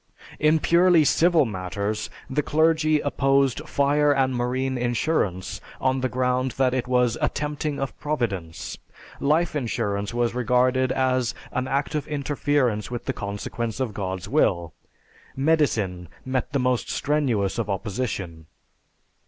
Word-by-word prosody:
In 155 +1 +4
purely 170 +1 +4
civil 165 -1 +4
matters, 100 +1 -3 0.2
the 145 +3 0
clergy 155 0 +2
opposed 135 -1 +1
fire 145 +1 +3
and 135 -2 +2
marine 130 +2 -1
insurance 120 - -1 0.2
on 130 0 +1
the 130 - 0
ground 125 0 0
that 130 -1 +2
it 130 -1 -1
was 125 -2 +2
a - - +3
tempting 150 0 -3
of 135 -1 -3
Providence. 100 - -3 0.4
Life 155 +4 +1
insurance 105 -6 -2
was 120 0 0
regarded 125 +1 +2
as 130 -2 +1 0.2
an 130 +1 -2
act 140 +3 -1
of 150 -2 -2
interference 140 -6 0
with 120 -1 -5
the - - -1
consequence 105 +3 -4
of 125 -5 -2
God's 95 -1 -4
will. 90 - +1 0.6
Medicine 115 - +1 0.2
met 130 +1 -2
the 140 - +1
most 125 -2 0
strenuous 125 -10 0
of 110 -2 -2
opposition. 95 -6 -3
130 Hz, 135 wpm, -24 LUFS, 110-145 Hz, 0.6 s, In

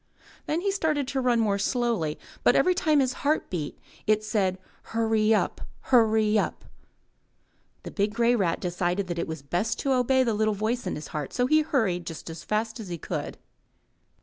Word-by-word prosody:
'* - - -25
Then 315 +3 0
he 400 +1 +1
started 310 -8 0
to 270 -1 -1
run 245 -2 +2
more 205 -3 +1
slowly, 225 - 0 0.3
but - - +5
every 365 - +4
time 310 -5 +2
his 260 0 +1
heart 300 +2 0
beat, 155 -5 -4 0.3
it 215 0 +3
said, 195 -4 0 0.4
''Hurry 220 -1 +2
up! 220 - +1 0.3
Hurry 220 -2 +4
up - - -3 0.6
!'' - - -42
The - - -7
big 210 +1 -1
grey 235 +1 +3
rat 190 -8 +1
decided 180 +2 -1
that 170 -1 -2
it - - -2
was 160 -3 -6
best 180 +10 -1
to 275 - +1
obey 260 +1 +3
the 230 -3 0
little 215 0 +1
voice 220 +2 -1
in - - -2
his 150 - -7
heart, 150 -3 -5
so 245 - +1
he 310 +4 +4
hurried 205 - 0
just 165 0 -7
as 165 +1 -9
fast 220 +2 -2
as 215 - -7
he 175 -1 -4
could. - - -5
220 Hz, 200 wpm, -26 LUFS, 185-250 Hz, 0.6 s, but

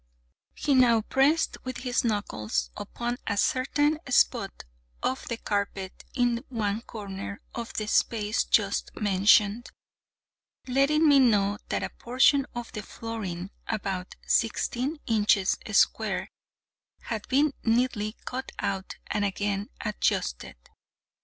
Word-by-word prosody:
He 290 - +1
now 240 -4 +5
pressed 280 +8 +2
with 255 -2 -5
his 250 +2 +1
knuckles 110 - -1
upon 240 +1 -4
a 205 - 0
certain 290 +7 +2
spot 235 -4 +2 0.4
of 260 - -1
the 235 - -3
carpet 200 -3 -3
in 245 -2 +1
one 215 -3 -1
corner 200 -3 -7
of 235 -1 -5
the 215 - -1
space 215 0 +1
just 200 -2 +1
mentioned, 205 +3 +3 1.0
letting 275 +5 +3
me 285 -2 +7
know 205 -5 +3
that - - -1
a - - -3
portion 265 +3 +3
of 240 -1 -5
the 215 - -5
flooring, 200 -4 -6 0.2
about 195 -4 -3
sixteen 265 +6 0
inches 210 -3 +3 0.2
square, - - +2 0.7
had 220 -2 -5
been 280 +2 +3
neatly 225 -2 +1
cut 260 +1 -5
out 195 -1 -3
and 205 - -1
again 200 +1 -1
adjusted. 210 - -1
225 Hz, 120 wpm, -27 LUFS, 200-255 Hz, 1.0 s, me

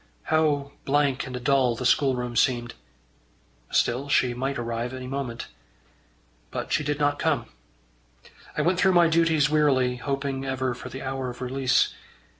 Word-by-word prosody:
How 145 -3 +2
blank 140 -2 +1
and 125 -1 -6
dull 130 -3 +3
the 125 - -5
schoolroom 125 -2 +2
seemed! 120 0 +1 1.0
Still 130 +4 +1
she 130 -3 +3
might 135 +3 -2
arrive 120 +1 -3
any 130 0 -7
moment. 130 -3 -4 1.0
But - - -4
she 155 - +2
did 145 0 -1
not 145 0 +1
come. - - +1 1.1
I 150 - +2
went 180 +3 +2
through 190 0 +4
my 175 -1 +6
duties 160 -3 +3
wearily, 130 -5 +2
hoping 135 0 -3
ever 130 -1 -1
for 125 +1 -9
the 135 +1 -7
hour 130 -1 -3
of 120 - -9
release. 130 0 +1
135 Hz, 150 wpm, -25 LUFS, 125-145 Hz, 1.1 s, my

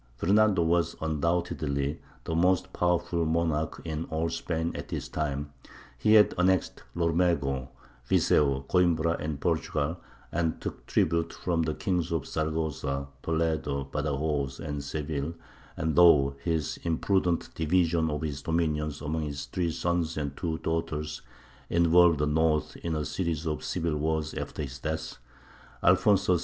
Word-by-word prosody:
Fernando 100 - +3
was 85 0 +1
undoubtedly 80 -2 -1 0.2
the - - -3
most 90 +2 +2
powerful 90 -1 +1
monarch 80 -1 0
in 80 0 -3
all 80 +1 -1
Spain 80 0 -2
at - - -6
this - - -4
time; 75 -1 -3 0.4
he 105 - +4
had 105 -1 +6
annexed 95 0 +2
Lormego, 85 -6 +1 0.4
Viseu, 70 -2 +4
and 70 +1 -8
Coimbra 85 -3 +2
in 75 -1 -3
Portugal, 80 0 -1 0.3
and 85 -2 -1
took - - -7
tribute 85 0 +1
from 85 -2 -1
the 80 -1 -1
kings 90 -4 -1
of 80 -4 -1
Zaragoza, 75 -3 -2
Toledo, 80 -3 0
Badajoz, 70 -1 -1
and 75 -2 -4
Seville; 75 +2 -3 0.4
and 80 0 -1
though 75 -6 +6
his 80 -2 -1
imprudent 85 +1 0
division 80 0 +2
of 75 +1 -3
his 70 -3 -3
dominions 75 -2 -1
among 80 +2 -1
his 70 -1 -4
three 90 -2 -1
sons 85 0 -1
and 70 -2 -3
two 80 -2 -2
daughters 80 -2 -2 0.5
involved 85 0 +5
the 75 - +1
north 75 +1 +1
in 85 -1 -3
a 75 -1 -2
series 85 -3 -2
of 75 -4 -2
civil 80 -2 -1
wars 80 0 -1
after 75 - -4
his 65 -1 -7
death, 80 -2 -4 0.6
Alfonso 95 -3 +4
VI. - - -4
80 Hz, 145 wpm, -28 LUFS, 75-85 Hz, 0.6 s, had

